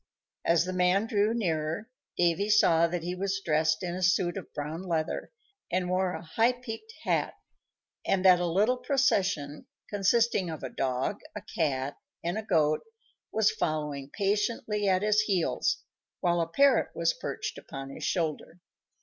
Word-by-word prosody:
As 170 0 +3
the 185 - -3
man 180 +3 +3
drew 210 -1 +2
nearer, 170 -3 -1 0.3
Davy 175 +4 +2
saw 170 -6 +5
that 170 0 -3
he 175 +1 -2
was 195 +2 -2
dressed 155 +1 +2
in 175 -1 -2
a 185 - -4
suit 175 -1 +2
of - - -7
brown 150 +4 -5
leather, 165 -4 -2 0.4
and 180 0 0
wore 185 0 +1
a - - -7
high 225 +9 +2
peaked 250 - -8
hat, - - 0 0.7
and 190 -1 0
that 180 -1 +7
a 175 - 0
little 210 +9 +2
procession, 200 - 0 0.2
consisting 205 -1 +2
of 160 -3 -6
a 130 - -3
dog, 130 +11 -1 0.2
a 210 - -5
cat, 140 -3 -1 0.3
and 170 +1 -1
a 220 - -2
goat, 155 -7 +2 0.5
was 220 -1 +3
following 150 -3 -2
patiently 210 +1 0
at 185 +1 +2
his 210 0 +4
heels, 195 -6 0 0.4
while 175 -1 +2
a 165 - -1
parrot 265 +9 +4
was 165 0 +2
perched 140 - -5
upon 135 0 -8
his - - -8
shoulder. 165 0 -2
180 Hz, 160 wpm, -29 LUFS, 160-210 Hz, 0.7 s, that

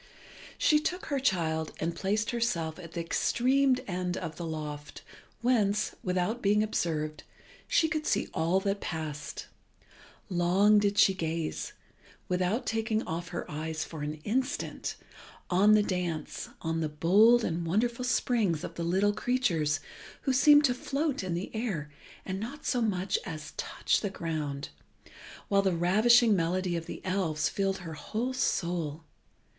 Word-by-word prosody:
She 300 - +4
took 355 +4 -3
her 280 -3 -1
child 160 - 0
and 165 +1 -2
placed 210 +4 0
herself 180 -10 -1
at 165 -2 -10
the 170 - -2
extreme 255 +9 +2
end 180 -1 -2
of 165 -3 -5
the 170 - -5
loft 150 -2 -6 0.4
whence, 215 -4 +2
without 185 +6 -1
being 210 +1 +3
observed, 155 -7 -2 0.5
she 320 - +3
could 310 0 -2
see - - +1
all 170 +4 +2
that 200 0 -1
passed. 150 -3 -5 0.8
Long 190 +4 +4
did 205 0 +1
she 195 - +6
gaze, 165 -3 -3 0.5
without 185 +6 0
taking 220 0 0
off 170 +1 -4
her 175 - -5
eyes 155 +1 -3
for 160 -2 -8
an 150 +1 -3
instant, 255 +5 -2 0.6
on 205 +4 +6
the 210 - +4
dance, 175 -6 -3
on 165 0 -1
the 155 -1 -1
bold 205 +10 +5
and 170 -2 -1
wonderful 235 +8 0
springs 225 -9 +1
of - - -5
the 170 - -4
little 190 +5 +2
creatures 165 - 0 0.4
who 265 - 0
seemed 290 +3 +7
to 250 - +3
float 275 0 -2
in 180 -2 -2
the 175 +3 -4
air 190 -11 -3 0.3
and 190 0 -3
not 275 +8 -7
so 245 - +1
much 195 -4 0
as 155 -2 -7
to - - -27
touch - - 0
the 205 - -1
ground, 155 -6 -4 0.8
while 200 -1 +3
the 190 -3 +1
ravishing 215 +6 +5
melody 180 +1 0
of 165 -1 -4
the - - -8
elves 165 -6 0
filled 195 +2 -1
her 165 - -6
whole 230 +10 -3
soul. 170 - -1
185 Hz, 155 wpm, -29 LUFS, 165-225 Hz, 0.8 s, seemed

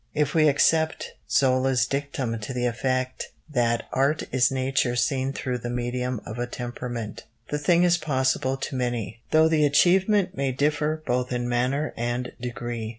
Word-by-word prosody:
If 150 -1 +1
we 155 -2 +4
accept 160 +2 +2 0.2
Zola's 130 -2 +3
dictum 135 -4 -3
to 110 +5 -6
the 125 0 0
effect 130 +2 -1 0.2
that 120 -5 +1
art 140 +4 +1
is 130 -1 +3
nature 130 -1 0
seen 130 +1 0
through 125 -2 -3
the 120 - -5
medium 125 0 -2
of 110 +2 -6
a 120 - -1
temperament, 120 -3 -6 0.2
the 150 - -1
thing 170 +4 +3
is 175 -1 +3
possible 130 -2 0
to 135 +1 -5
many, 120 -3 -3
though 160 0 +5
the 160 -2 +2
achievement 185 +6 +3
may 135 -1 -1
differ 150 +3 0
both 125 +1 -1
in 120 0 -1
manner 130 +5 0
and 120 +1 -2
degree. 120 -2 -4
130 Hz, 160 wpm, -25 LUFS, 120-145 Hz, 0.2 s, though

